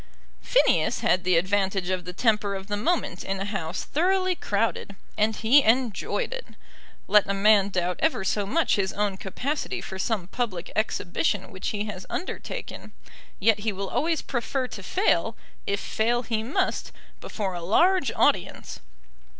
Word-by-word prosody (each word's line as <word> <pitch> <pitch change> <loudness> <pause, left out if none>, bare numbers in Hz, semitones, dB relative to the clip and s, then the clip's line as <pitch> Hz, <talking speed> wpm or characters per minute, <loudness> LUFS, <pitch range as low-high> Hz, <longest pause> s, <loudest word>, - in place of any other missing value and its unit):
Phineas - - +2
had 185 0 +2
the 180 -2 +3
advantage 190 0 0
of 185 -1 -2
the 180 - -5
temper 210 0 +1
of 190 0 -6
the 205 0 -2
moment 250 - -1
in 195 0 -3
a 195 - -2
House 190 -5 -3
thoroughly 370 +3 +1
crowded, 205 - -2 0.2
and 215 +1 +1
he 240 +8 +5
enjoyed 255 - 0
it. - - -7 0.6
Let 210 -2 +4
a 200 - +1
man 200 0 +5
doubt 180 -2 -1
ever 315 -10 +1
so 200 +1 0
much 325 +4 +2
his 190 -1 0
own 205 -1 0
capacity 265 +11 -3
for 190 - -7
some 205 -3 -1
public 195 -3 -4
exhibition 200 -3 -1
which 185 - -5
he 205 -1 -2
has 185 -3 -7
undertaken; 365 - -6 0.5
yet 215 +1 +3
he 215 +1 -1
will 195 0 -5
always 325 0 0
prefer 255 +1 -2
to 200 - -7
fail, 370 - +1 0.3
if 200 0 0
fail 240 +4 0
he 225 -2 -1
must, 235 +6 -1 0.3
before 195 -4 -4
a 175 - -5
large 280 - +3
audience. - - 0
205 Hz, 160 wpm, -26 LUFS, 190-245 Hz, 0.6 s, he